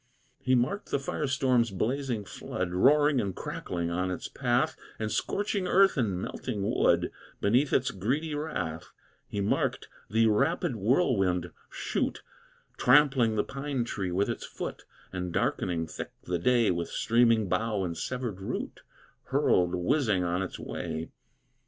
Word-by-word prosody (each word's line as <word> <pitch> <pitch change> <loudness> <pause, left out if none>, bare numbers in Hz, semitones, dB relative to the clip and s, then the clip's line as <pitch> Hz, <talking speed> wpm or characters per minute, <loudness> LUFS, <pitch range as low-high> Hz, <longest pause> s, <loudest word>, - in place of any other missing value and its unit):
He 130 0 +2
marked 130 - 0
the - - +1
fire 140 +2 -2
storm's 130 -3 +2
blazing 115 +2 -2
flood 90 -1 -4
Roaring 145 +8 +4
and 100 -3 -3
crackling 85 -1 -4
on 90 +2 -1
its 90 - -4
path, - - 0 0.2
And 110 -1 -3
scorching 200 -2 -1
earth, 195 +2 +5
and 105 - 0
melting 105 +2 -4
wood, - - +2 0.3
Beneath 125 +8 +2
its 130 - +2
greedy 140 - -1
wrath; 90 - -3 0.4
He 100 - -3
marked 100 - 0 0.2
the 115 +2 +3
rapid 135 - +2
whirlwind 95 - +1 0.2
shoot, - - -2 0.5
Trampling 130 -4 +5
the 105 - +2
pine 135 -2 -3
tree 100 -6 -3
with 95 +3 +1
its - - -3
foot, - - -6 0.3
And 90 -1 -3
darkening 85 -1 0
thick 80 - -7
the 90 -1 -2
day 120 +3 +3
With 85 -1 -2
streaming 115 -2 +3
bough 105 +2 0
and 85 -2 -3
severed 120 -1 -4
root, 95 - -4 0.4
Hurled 90 0 +2
whizzing 105 - +1
on 90 +1 0
its 95 - -4
way. 80 -1 -5
110 Hz, 145 wpm, -29 LUFS, 90-135 Hz, 0.5 s, earth